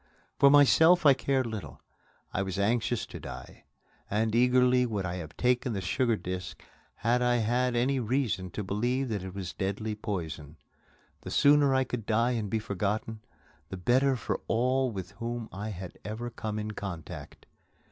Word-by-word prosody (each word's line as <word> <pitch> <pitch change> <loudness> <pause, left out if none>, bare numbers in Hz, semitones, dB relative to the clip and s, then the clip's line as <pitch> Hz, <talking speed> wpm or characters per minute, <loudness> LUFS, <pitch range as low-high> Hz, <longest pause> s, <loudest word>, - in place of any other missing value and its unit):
For 140 - +7
myself 160 +5 +6
I 140 - +9
cared 135 -1 0
little. 110 -4 -6 0.5
I 100 - 0
was 95 -1 -3
anxious 115 +3 +1
to - - -9
die, - - -10 0.4
and 110 +1 0
eagerly 125 +1 +4
would 105 -4 -2
I 90 0 -3
have 80 -4 -8
taken 125 -1 +1
the 100 - -2
sugar 115 +6 +1
disc 90 -3 -6 0.4
had 120 +2 +1
I 125 0 +3
had 120 +2 +1
any 130 +3 +1
reason 115 -6 -1
to 105 - -3
believe 120 +7 -1
that 105 -4 -2
it 95 0 -8
was 95 -3 -5
deadly 100 +3 -2
poison. 80 -8 -5 0.6
The - - -7
sooner 145 -1 +5
I 130 - +3
could 125 -4 -5
die 115 +3 +2
and 110 -4 -2
be 110 - 0
forgotten, 105 +1 -2 0.5
the 95 - -5
better 130 +8 +3
for 120 - -3
all 130 +3 +2
with 95 -4 -6
whom 120 -1 -3
I 105 +4 -5
had 95 -3 -8
ever 115 +3 -5
come 110 -2 -4
in 105 0 -3
contact. 95 -6 -8
115 Hz, 170 wpm, -29 LUFS, 100-125 Hz, 0.6 s, I